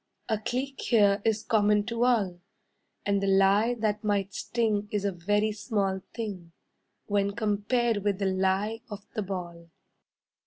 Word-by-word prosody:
A 220 Hz, -2 st, +1 dB
cleek 260 Hz, +5 st, -3 dB
here 205 Hz, -4 st, +3 dB
is 220 Hz, -1 st, +1 dB
common 210 Hz, -2 st, +3 dB
to 235 Hz, +1 st, 0 dB
all; 200 Hz, -8 st, +1 dB, 0.7 s
And 200 Hz, -1 st, +1 dB
the 195 Hz, -, 0 dB
lie 195 Hz, +5 st, +4 dB
that 215 Hz, -2 st, -1 dB
might 200 Hz, -2 st, 0 dB
sting 215 Hz, -3 st, -1 dB
is 205 Hz, -1 st, -1 dB
a 200 Hz, -, +1 dB
very 205 Hz, +5 st, 0 dB
small 200 Hz, -3 st, -1 dB
thing 190 Hz, -7 st, -5 dB, 0.5 s
When 200 Hz, 0 st, 0 dB
compared 225 Hz, +2 st, +1 dB
with 205 Hz, -1 st, 0 dB
the 200 Hz, -, -1 dB
lie 190 Hz, +4 st, 0 dB
of 205 Hz, -2 st, -8 dB
the 215 Hz, -, -2 dB
ball. 175 Hz, -4 st, -6 dB
205 Hz, 150 wpm, -28 LUFS, 195-220 Hz, 0.7 s, lie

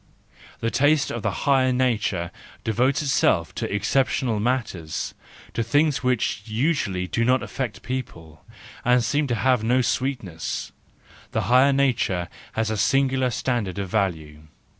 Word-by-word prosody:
The 115 Hz, -, 0 dB
taste 145 Hz, +2 st, +3 dB
of 120 Hz, -, -4 dB
the -, -, 0 dB, 0.2 s
higher 130 Hz, -2 st, +4 dB
nature 110 Hz, -9 st, 0 dB, 0.3 s
devotes 130 Hz, +7 st, +1 dB
itself 135 Hz, -, +2 dB
to -, -, -4 dB
exceptional 115 Hz, +2 st, +1 dB
matters, 105 Hz, -9 st, -2 dB, 0.4 s
to -, -, -1 dB
things 145 Hz, +5 st, +2 dB
which 125 Hz, -5 st, 0 dB
usually 110 Hz, -, 0 dB
do 115 Hz, +5 st, -1 dB
not 130 Hz, +2 st, +3 dB
affect 130 Hz, -6 st, -5 dB
people, 85 Hz, -, -6 dB, 0.4 s
and 125 Hz, 0 st, +4 dB
seem 145 Hz, +5 st, +1 dB
to 120 Hz, -, 0 dB
have 125 Hz, -1 st, +2 dB
no 125 Hz, +3 st, +3 dB
sweetness; 120 Hz, -, -2 dB, 0.6 s
the -, -, +1 dB
higher 130 Hz, +3 st, +5 dB
nature 120 Hz, -11 st, +1 dB, 0.2 s
has 110 Hz, -1 st, -1 dB
a 110 Hz, -, -1 dB
singular 130 Hz, +3 st, +2 dB
standard 120 Hz, -6 st, -2 dB
of 100 Hz, -2 st, -3 dB
value. 80 Hz, -7 st, -2 dB
120 Hz, 140 wpm, -24 LUFS, 100-130 Hz, 0.6 s, higher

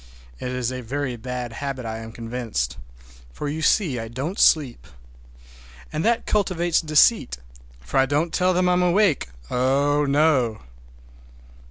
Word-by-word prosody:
It -, -, -4 dB
is 125 Hz, -1 st, -2 dB
a 130 Hz, 0 st, -5 dB
very 130 Hz, +1 st, -3 dB
bad 125 Hz, 0 st, -5 dB
habit, 135 Hz, -1 st, -5 dB
I 110 Hz, 0 st, -4 dB
am 115 Hz, 0 st, -8 dB
convinced, 115 Hz, -, -4 dB, 0.5 s
for, 145 Hz, -, -5 dB
you 155 Hz, +2 st, -3 dB
see, 155 Hz, -, +2 dB
I 115 Hz, -, -5 dB
don't 135 Hz, -, -5 dB
sleep. 140 Hz, -, +3 dB, 1.1 s
And 155 Hz, -, -1 dB
that 235 Hz, 0 st, +1 dB
cultivates 175 Hz, -5 st, +1 dB
deceit, 155 Hz, -, +3 dB, 0.4 s
for -, -, -4 dB
I 135 Hz, -, +3 dB
don't 155 Hz, +4 st, 0 dB
tell 185 Hz, 0 st, +2 dB
them 180 Hz, 0 st, +2 dB
I'm 180 Hz, 0 st, +3 dB
awake,—oh, 145 Hz, -, +1 dB
no! 140 Hz, -, +2 dB
135 Hz, 140 wpm, -23 LUFS, 120-160 Hz, 1.1 s, sleep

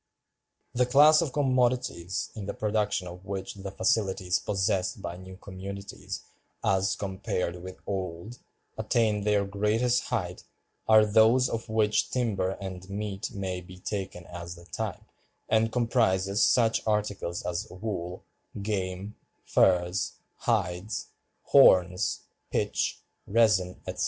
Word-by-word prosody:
"The 125 Hz, 0 st, +2 dB
class 150 Hz, +5 st, +7 dB
of 160 Hz, -5 st, -1 dB
commodities 125 Hz, -, 0 dB
in 105 Hz, -3 st, -6 dB
the -, -, -4 dB
production 105 Hz, -3 st, 0 dB
of 90 Hz, +1 st, -9 dB
which 95 Hz, 0 st, -5 dB
the 100 Hz, -1 st, -7 dB
facilities 95 Hz, -4 st, +1 dB
possessed 100 Hz, -1 st, 0 dB
by 85 Hz, -2 st, -5 dB
new 95 Hz, +1 st, -11 dB
communities, 100 Hz, +1 st, -7 dB, 0.4 s
as 95 Hz, 0 st, +2 dB
compared 95 Hz, -3 st, -3 dB
with 95 Hz, +1 st, -8 dB
old, 95 Hz, +4 st, -4 dB, 0.4 s
attain 110 Hz, -3 st, +1 dB
their 105 Hz, -1 st, +3 dB
greatest 105 Hz, +5 st, +1 dB
height, 90 Hz, -7 st, -3 dB, 0.4 s
are 110 Hz, -1 st, +7 dB
those 110 Hz, +4 st, +5 dB
of 115 Hz, 0 st, -4 dB
which 110 Hz, -1 st, +2 dB
timber 105 Hz, -7 st, -1 dB
and 95 Hz, -1 st, -7 dB
meat 100 Hz, 0 st, -4 dB
may 95 Hz, -2 st, -3 dB
be 90 Hz, +1 st, -12 dB
taken 95 Hz, -2 st, -5 dB
as 85 Hz, 0 st, -7 dB
the 85 Hz, 0 st, -14 dB
type, 100 Hz, +4 st, -4 dB, 0.4 s
and 110 Hz, 0 st, +2 dB
comprises 110 Hz, -4 st, +2 dB
such 115 Hz, -2 st, +4 dB
articles 105 Hz, -5 st, -1 dB
as 85 Hz, 0 st, -3 dB
wool, 90 Hz, -2 st, -5 dB, 0.4 s
game, 100 Hz, -1 st, -3 dB, 0.3 s
furs, 90 Hz, 0 st, +2 dB, 0.2 s
hides, 90 Hz, +5 st, -1 dB, 0.3 s
horns, 90 Hz, +1 st, +5 dB, 0.3 s
pitch, -, -, -1 dB, 0.3 s
resin, 100 Hz, -5 st, +3 dB
etc. -, -, -5 dB
100 Hz, 120 wpm, -28 LUFS, 95-110 Hz, 0.4 s, class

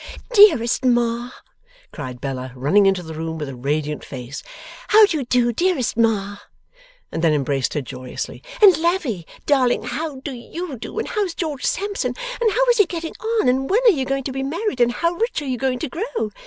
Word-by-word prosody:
'Dearest 315 Hz, -, +6 dB
Ma,' 240 Hz, -1 st, +1 dB, 0.6 s
cried 125 Hz, -1 st, -7 dB
Bella, 130 Hz, -1 st, -4 dB
running 180 Hz, +11 st, +3 dB
into 190 Hz, -2 st, +1 dB
the 160 Hz, -1 st, -8 dB
room 160 Hz, +1 st, -4 dB
with 150 Hz, -2 st, -4 dB
a 135 Hz, -, -7 dB
radiant 150 Hz, +4 st, -2 dB
face, 130 Hz, 0 st, -7 dB, 0.5 s
'how 430 Hz, 0 st, +8 dB
do 330 Hz, -6 st, -1 dB
you 270 Hz, -, -3 dB
do, 240 Hz, -1 st, +2 dB
dearest 340 Hz, -3 st, 0 dB
Ma?' 210 Hz, -3 st, +1 dB, 0.7 s
And 165 Hz, -, -3 dB
then 160 Hz, -2 st, +4 dB
embraced 135 Hz, -2 st, -1 dB
her, 150 Hz, -, 0 dB
joyously. 125 Hz, +1 st, -7 dB, 0.2 s
'And 385 Hz, -4 st, +9 dB
Lavvy 320 Hz, -, -1 dB, 0.2 s
darling, 260 Hz, -4 st, +2 dB
how 305 Hz, +2 st, -4 dB
do 280 Hz, -, -5 dB
YOU 270 Hz, +3 st, -7 dB
do, -, -, -8 dB
and 445 Hz, -, -2 dB
how's 405 Hz, -6 st, -1 dB
George 300 Hz, -5 st, -3 dB
Sampson, 405 Hz, +1 st, -1 dB, 0.3 s
and 450 Hz, -2 st, +3 dB
how -, -, +2 dB
is 475 Hz, -, 0 dB
he 410 Hz, -, +5 dB
getting 330 Hz, -2 st, -5 dB, 0.3 s
on, -, -, 0 dB
and 265 Hz, +2 st, +1 dB
when 430 Hz, +5 st, +3 dB
are -, -, +9 dB
you 270 Hz, -8 st, -1 dB
going 275 Hz, +1 st, -1 dB
to 265 Hz, -, -4 dB
be 270 Hz, +1 st, -3 dB
married, 305 Hz, -, -2 dB
and 240 Hz, 0 st, +4 dB
how 335 Hz, +7 st, 0 dB
rich 450 Hz, +5 st, -1 dB
are 295 Hz, -, -6 dB
you 255 Hz, -2 st, -2 dB
going 265 Hz, -1 st, 0 dB
to 310 Hz, -, -3 dB
grow? 335 Hz, -, -3 dB
255 Hz, 205 wpm, -21 LUFS, -, 0.7 s, And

